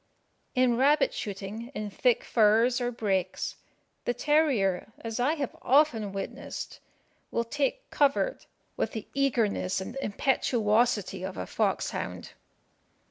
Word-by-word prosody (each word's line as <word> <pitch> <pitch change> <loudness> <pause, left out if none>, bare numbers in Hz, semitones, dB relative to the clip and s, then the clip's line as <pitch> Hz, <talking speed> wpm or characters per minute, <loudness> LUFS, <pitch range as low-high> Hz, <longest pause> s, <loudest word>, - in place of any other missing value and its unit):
In 250 -2 +3
rabbit 285 +3 +4
shooting 210 +4 -5
in 210 -1 -4
thick 245 +4 +2
furze 230 +3 +3
or 245 0 0
breaks, 200 -6 -1 0.5
the 245 - 0
terrier, 250 - +2
as 230 +1 -4
I 280 +6 +2
have 280 -5 -4
often 250 -7 +3
witnessed, 195 0 -6 0.5
will 235 - 0
take 290 - -2
covert 290 - +1 0.3
with - - -2
the 220 - -5
eagerness 230 -9 +1
and 190 +6 -6
impetuosity 215 -4 +1
of 185 0 -5
a - - -3
foxhound. - - -2
235 Hz, 120 wpm, -28 LUFS, 210-270 Hz, 0.5 s, rabbit